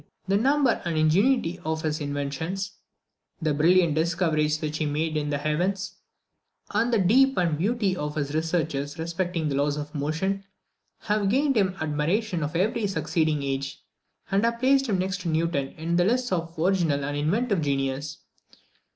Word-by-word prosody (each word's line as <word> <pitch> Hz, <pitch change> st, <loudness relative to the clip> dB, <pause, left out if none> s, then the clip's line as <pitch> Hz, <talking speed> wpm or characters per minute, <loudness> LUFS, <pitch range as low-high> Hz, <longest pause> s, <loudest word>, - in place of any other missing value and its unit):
The 195 Hz, -, +2 dB
number 270 Hz, +3 st, +2 dB
and 170 Hz, -3 st, -2 dB
ingenuity 180 Hz, +3 st, +2 dB
of 160 Hz, 0 st, -2 dB
his 155 Hz, -1 st, -1 dB
inventions, 145 Hz, +7 st, -3 dB, 0.7 s
the 155 Hz, -3 st, 0 dB
brilliant 170 Hz, +2 st, +4 dB
discoveries 155 Hz, -2 st, +1 dB
which 155 Hz, 0 st, -3 dB
he 155 Hz, -, 0 dB
made 155 Hz, +2 st, -1 dB
in 150 Hz, -1 st, -1 dB
the 145 Hz, -, 0 dB
heavens, 185 Hz, +6 st, -1 dB, 0.7 s
and 225 Hz, +3 st, +1 dB
the 230 Hz, -, +3 dB
depth 260 Hz, +8 st, +4 dB
and 170 Hz, -4 st, +2 dB
beauty 200 Hz, +3 st, 0 dB
of 150 Hz, -4 st, -4 dB
his 145 Hz, -1 st, -2 dB
researches 155 Hz, -3 st, -1 dB
respecting 170 Hz, 0 st, -2 dB
the 145 Hz, -, -1 dB
laws 145 Hz, +1 st, +1 dB
of 150 Hz, 0 st, -6 dB
motion, 165 Hz, +7 st, -1 dB, 0.6 s
have 210 Hz, -1 st, 0 dB
gained 275 Hz, +4 st, +2 dB
him 195 Hz, -4 st, +2 dB
the 190 Hz, -, -5 dB
admiration 165 Hz, +6 st, 0 dB
of 150 Hz, +1 st, -3 dB
every 205 Hz, +4 st, +1 dB
succeeding 155 Hz, -4 st, 0 dB
age, 135 Hz, 0 st, -3 dB, 0.5 s
and 195 Hz, +2 st, +2 dB
have 235 Hz, 0 st, +1 dB
placed 270 Hz, +2 st, +3 dB
him 200 Hz, -, +2 dB
next 190 Hz, +1 st, -2 dB
to 175 Hz, -, -3 dB
Newton 160 Hz, -3 st, 0 dB
in 165 Hz, +2 st, -1 dB
the 175 Hz, -, +4 dB
lists 245 Hz, +4 st, +1 dB
of 165 Hz, -2 st, -2 dB
original 165 Hz, -5 st, +1 dB
and 145 Hz, +1 st, -3 dB
inventive 195 Hz, +7 st, +1 dB
genius. 140 Hz, +1 st, -2 dB
165 Hz, 170 wpm, -26 LUFS, 150-195 Hz, 0.7 s, brilliant